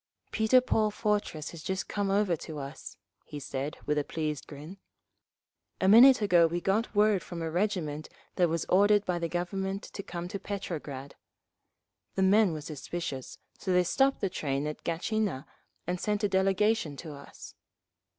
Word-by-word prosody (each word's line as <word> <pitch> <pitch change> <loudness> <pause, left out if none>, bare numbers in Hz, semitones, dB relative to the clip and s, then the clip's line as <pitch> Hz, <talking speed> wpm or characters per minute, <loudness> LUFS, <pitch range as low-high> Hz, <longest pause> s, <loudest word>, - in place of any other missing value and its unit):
"Peter 225 +4 +4
Paul 220 -4 +1
Fortress 210 -7 -2
has 170 - -10
just 190 +3 -3
come 205 -1 -1
over 195 -3 +2
to 155 0 -8
us," 140 +1 -8 0.4
said 140 +1 -4
he, - - -21
with 150 0 +1
a - - -1
pleased 150 -2 -4
grin. 155 +7 -10 1.0
"A 190 - +2
minute 245 +3 +8
ago 175 -4 +5
we 170 +2 -2
got 210 +5 0
word 210 -2 +4
from 170 -1 -6
a 160 - -3
regiment 170 -5 -1 0.3
that 175 -2 +3
was 165 0 -1
ordered 205 +2 +4
by 175 -1 -1
the 170 -1 -2
Government 190 +3 -3
to - - -7
come 175 -2 -6
to 200 - -4
Petrograd. 155 -9 -6 1.0
The 190 - +2
men 200 0 +5
were 155 -1 -5
suspicious, 150 -2 -6 0.2
so 190 - -2
they 180 0 +4
stopped 270 +9 +2
the 195 - +1
train 140 -4 -2
at 150 0 -5
Gatchina 175 -3 -1 0.4
and 180 +1 -3
sent 210 0 -1
a - - +4
delegation 190 -3 +1
to 155 -1 -8
us. 140 0 -12
180 Hz, 170 wpm, -29 LUFS, 155-205 Hz, 1.0 s, minute